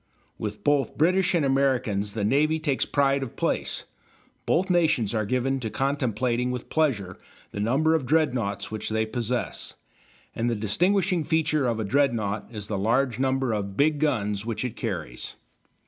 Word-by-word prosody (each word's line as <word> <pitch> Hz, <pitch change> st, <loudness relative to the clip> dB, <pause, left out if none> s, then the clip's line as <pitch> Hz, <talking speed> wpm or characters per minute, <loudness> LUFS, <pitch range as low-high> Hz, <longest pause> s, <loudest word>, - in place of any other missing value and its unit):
With 105 Hz, -1 st, -5 dB
both 145 Hz, -2 st, +1 dB
British 185 Hz, +4 st, +3 dB
and 160 Hz, -4 st, +2 dB
Americans 130 Hz, -7 st, +1 dB
the 105 Hz, -2 st, -2 dB
navy 150 Hz, +8 st, +3 dB
takes 145 Hz, -4 st, 0 dB
pride 140 Hz, -1 st, +2 dB
of 130 Hz, -4 st, -6 dB
place; -, -, -1 dB, 0.6 s
both 185 Hz, +2 st, +2 dB
nations 155 Hz, -, +2 dB
are 110 Hz, -2 st, 0 dB
given 130 Hz, +2 st, 0 dB
to 115 Hz, -3 st, -3 dB
contemplating 125 Hz, -2 st, 0 dB
with 125 Hz, -1 st, -5 dB
pleasure 110 Hz, -, 0 dB, 0.3 s
the -, -, -6 dB
number 135 Hz, +10 st, +2 dB
of 150 Hz, -6 st, 0 dB
dreadnoughts 120 Hz, -11 st, 0 dB
which 110 Hz, -, -3 dB
they 110 Hz, 0 st, +1 dB
possess, 120 Hz, +2 st, -3 dB, 0.6 s
and 120 Hz, +1 st, 0 dB
the 120 Hz, -, 0 dB
distinguishing 175 Hz, -, +1 dB
feature 155 Hz, -3 st, +1 dB
of 115 Hz, -2 st, -1 dB
a -, -, 0 dB
dreadnought 110 Hz, -3 st, 0 dB
is 105 Hz, -3 st, -6 dB
the 100 Hz, -2 st, -2 dB
large 120 Hz, +3 st, +1 dB
number 130 Hz, -2 st, +1 dB
of 100 Hz, -2 st, -3 dB
big 150 Hz, +1 st, +3 dB
guns 105 Hz, -9 st, 0 dB
which 115 Hz, +1 st, -3 dB
it 125 Hz, -2 st, -4 dB
carries. 85 Hz, -, -5 dB
125 Hz, 165 wpm, -26 LUFS, 110-145 Hz, 0.6 s, British